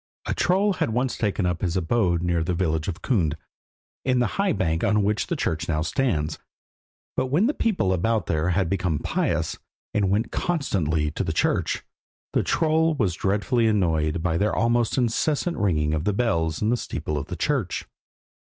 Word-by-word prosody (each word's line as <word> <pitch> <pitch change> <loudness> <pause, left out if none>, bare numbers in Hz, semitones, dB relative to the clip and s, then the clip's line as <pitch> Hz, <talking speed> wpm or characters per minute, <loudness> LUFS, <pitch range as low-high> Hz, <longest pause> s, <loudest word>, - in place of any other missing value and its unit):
A - - -1
troll 195 +3 +2
had 180 - -1
once 125 +3 0
taken 105 -3 0
up 90 -1 -1
his 90 0 0
abode 90 -1 +1
near 85 -2 +1
the 90 +2 -1
village 80 -3 0
of 90 -4 -5
Kund, 85 - +1 0.7
in 130 -1 +2
the 120 - 0
high 200 -2 +2
bank 80 - 0
on 105 0 +3
which 105 +1 0
the - - -1
church 80 0 -2
now 75 -1 +1
stands, 85 - -1 0.8
but 130 - 0
when 155 +11 +2
the 280 - +2
people 180 - +1
about 110 +3 +1
there 80 +2 0
had 90 0 +1
become 90 -3 0
pious, - - -1 0.3
and 100 -2 +2
went 105 +4 0
constantly 80 - 0
to - - -2
church, - - 0 0.5
the - - +3
troll 160 0 +2
was 105 - +1
dreadfully 105 +6 +1
annoyed 80 -6 +1
by 85 -2 +1
their 105 +1 +1
almost 120 +1 +1
incessant 145 +7 +1
ringing 75 -6 +1
of 80 0 -1
bells 85 -8 0
in 105 - +2
the 120 - +2
steeple - - -4
of - - -3
the - - -5
church. - - -1
100 Hz, 180 wpm, -24 LUFS, 80-120 Hz, 0.8 s, on